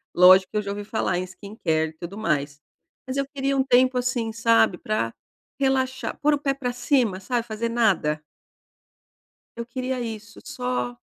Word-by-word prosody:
Lógico 185 +1 +7
que 210 - -2
eu - - +2
já 200 -1 -4
ouvi 205 0 -5
falar 210 -4 -1
em 180 - -1
skincare 180 -5 -2
e - - -14
tudo 170 +5 -8
mais. 145 -7 -1 0.4
Mas 260 +1 -4
eu 275 - +1
queria 275 0 0
um 265 - +3
tempo, 255 0 +4
assim, 245 -2 -1
sabe, 230 -4 +3
pra 145 - -2 0.5
relaxar, 260 -1 0
pôr 300 +1 +4
o - - -6
pé 275 -1 0
pra 255 -3 -3
cima, 245 -5 +1
sabe, 235 +4 -1
fazer 225 0 -3
nada. 190 -10 +1 1.3
Eu 235 - -4
queria 255 +1 -3
isso, 225 -1 -7
só 125 -1 -3
225 Hz, 175 wpm, -24 LUFS, 180-255 Hz, 1.3 s, Lógico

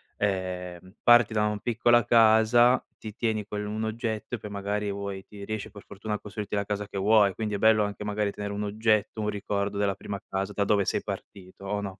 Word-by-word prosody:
ehm, 95 -1 -3
parti 120 -2 +6
da 105 0 +2
un 105 -1 -2
piccola 120 0 +3
casa, 115 +2 +5 0.2
ti 110 -2 -8
tieni 110 -2 -1
quell'1 105 +1 -3
oggetto 110 +1 -3
e - - -5
poi 105 0 -8
magari 100 +1 -2
vuoi 100 -1 -5
ti 100 -1 -11
riesce 110 -1 -5
per 100 -1 -12
fortuna 105 +2 -6
a 105 - -2
costruirti 105 0 -5
la 100 - 0
casa 105 0 -3
che 100 - -7
vuoi, 100 0 +4
quindi 105 -2 -2
è - - -1
bello 110 0 +4
anche 105 0 -4
magari 105 -1 -1
tenere 100 0 -5
un 105 +1 -3
oggetto, 110 +1 0
un 105 - -1
ricordo 100 0 -2
della 100 -2 +1
prima 100 -1 -6
casa 95 +1 -3
da 100 - 0
dove 100 -1 +2
sei - - -1
partito, 95 0 -8
o 100 +1 -2
no? 100 -1 -4
105 Hz, 215 wpm, -27 LUFS, 100-110 Hz, 0.2 s, parti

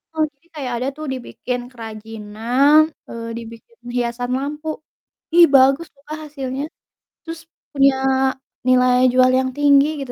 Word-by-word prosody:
Oh, 315 - +2
jadi 285 +5 -34
kayak 260 -5 -4
ada 255 - -1
tuh 310 - -6
dibikin 250 0 -5
kerajinan, 225 +5 +1 0.3
eee, 230 0 -7
dibikin 230 - -11 0.2
hiasan 245 +1 -2
lampu, 295 +3 -5 0.7
ih 345 0 +8
bagus 270 +4 +5
tuh 280 - -27
Kak, 310 - -5
hasilnya. 275 -2 -5 0.6
Terus 330 -1 -7 0.3
punya 275 -1 +4 0.7
nilai 255 0 +4 0.2
jual 255 0 +5
yang 260 0 -1
tinggi 285 -1 +5
gitu 255 -2 -6
260 Hz, 135 wpm, -20 LUFS, 245-290 Hz, 0.7 s, ih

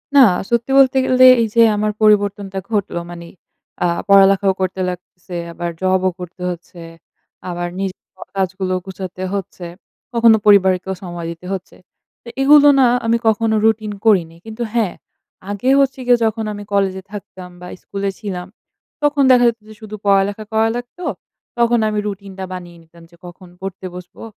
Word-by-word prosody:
না। - - +8 0.3
সত্যি 235 +2 0
বলতে 270 -1 +5
গেলে 255 0 +5 0.2
এইযে 230 +1 +2
আমার 210 +1 0
পরিবর্তনটা 205 -2 +2
ঘটলো 200 -5 -1
মানে 170 -1 -9 0.6
আ - - +2 0.2
পড়ালেখাও 195 0 +5
করতে 185 0 -2
লাগতেছে, 180 0 -9 0.2
আবার 175 0 -4
জবও 185 0 +2
করতে 180 0 -10
হচ্ছে। 175 0 -9 0.7
আবার 175 0 -3
নিজের 195 -1 -5
সব 185 - -12
কাজগুলো 190 0 -1
গুছাতে 185 -1 -7
হচ্ছে। 190 -2 -5 0.5
কখনো 230 -1 +5
পরিবারকেও 190 -2 +4
সময় 175 -2 -6
দিতে 170 +2 -11
হচ্ছে। 190 -1 -7 0.5
তো - - -17
এইগুলো 290 +1 +7
না 260 - +6 0.2
আমি 230 +1 +2
কখনো 220 0 +2
রুটিন 220 -1 +1
করিনি। 170 -6 +3
কিন্তু 220 +2 -5
হ্যাঁ 220 -6 0 0.6
আগেও 250 +7 +1
হচ্ছে 270 -1 0
গিয়ে 245 -1 +5
যখন 220 0 -1
আমি 205 0 -8
কলেজে 190 -1 0
থাকতাম 185 -3 -9
বা 180 - -8
স্কুলে 200 0 -4
ছিলাম, 185 -5 -5 0.6
তখন 290 -1 +2
দেখা 245 -1 +5
যেতো 230 -2 -7
যে 215 - -11
শুধু 215 -1 -8
পড়ালেখা 200 +2 +2
করা 220 +1 +2
লাগতো। 245 +9 -8 0.5
তখন 235 0 +3
আমি 210 -1 -1
রুটিনটা 195 -1 -7
বানিয়ে 175 -2 -9
নিতাম 165 +1 -19
যে - - -19
কখন 180 +1 -12
পড়তে 190 -1 -7
বসবো, 180 +4 -11
200 Hz, 160 wpm, -18 LUFS, 185-225 Hz, 0.7 s, না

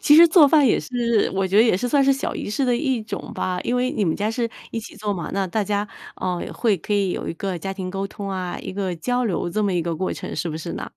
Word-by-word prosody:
其 295 - +6
实 335 +2 +10
做 325 -2 +7
饭 295 -1 +5
也 230 - +4
是 235 -3 0
我 195 0 +1
觉 190 +2 0
得 215 - +8
也 230 -6 +3
是 245 +6 -2
算 280 +2 +4
是 275 - +5
小 270 - -2
仪 - - -4
式 215 +6 0
的 245 - +2
一 260 -4 0
种 215 -2 -6
吧。 180 -1 -2
因 245 - -1
为 250 +1 +1
你 210 - 0
们 165 - +1
家 210 +2 -1
是 230 0 -1 0.2
一 230 - -3
起 220 - -11
做 210 0 -2
嘛， 175 -5 -4
那 195 -1 0
大 210 +4 -1
家， 205 +1 -1 0.3
嗯， 180 -2 -1
会 220 -5 +1
可 180 +5 -5
以 200 -2 +2
有 - - -3
一 - - -3
个 185 0 -3
家 195 +4 -4
庭 185 -2 -5
沟 195 +1 -3
通 200 0 -7
啊， 185 -2 -3
一 - - -6
个 190 -2 -2
交 245 +9 0
流 185 -6 -1
这 215 +4 0
么 200 -2 +1
一 175 -2 +1
个 170 0 -2
过 185 +4 -2
程， - - -6
是 160 +3 -2
不 155 - -4
是 165 +2 -5
呢？ - - -5
205 Hz, 325 characters per minute, -23 LUFS, 185-240 Hz, 0.3 s, 实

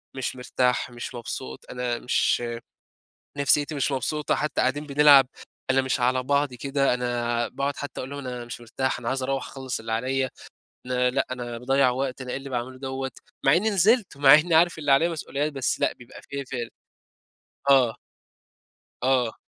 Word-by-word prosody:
مش 130 -1 -3
مرتاح 125 0 0
مش 120 +1 -7
مبسوط، 65 - -6
أنا 125 -1 -2
مش 120 -1 +1 1.0
نفسيتي 145 +2 +3
مش 140 0 0
مبسوطة، 150 +3 0
حتى 150 - -1
قاعدين 150 +1 0
بنلعب 140 -2 +7 0.4
أنا 135 0 +4
مش 130 -1 -1
على 130 +1 +2
بعضي 140 -1 0
كده، 135 0 +1
أنا 120 -1 -1
باقعد 140 +2 -3
حتى 145 - -6
أقول 130 - -6
لهم: 140 - -6
"أنا 125 -1 -5
مش 120 0 -8
مرتاح 130 +3 -2
أنا 120 -1 -5
عايز 130 0 -1
أروَّح 135 0 -2
أخلّص 130 -3 -5
اللي 115 0 -5
عليّا، 130 +3 0 0.6
أنا 125 0 +1
لأ، 135 +2 0
أنا 120 -2 -5
باضيَّع 135 +1 +3
وقت، 130 +1 -3
أنا 125 -1 -6
إيه - - -2
اللي 135 0 -8
باعمله 130 +1 -4
دوّة." 135 0 -4 0.3
مع 135 - +6
إني 215 +5 +2
نزلت، 200 - +2
مع 140 0 +7
إني 160 +2 +5
عارف 170 0 +4
اللي 145 -2 0
عليّا 165 +5 +4
مسؤوليات 150 -2 -3
بس 135 -2 -1
لأ، - - +1
بيبقى 120 0 -14
في 140 -1 -6
فال 120 -3 -5 1.0
آه. 125 -5 +5 1.1
آه. 125 -3 +1
130 Hz, 175 wpm, -25 LUFS, 125-140 Hz, 1.1 s, بنلعب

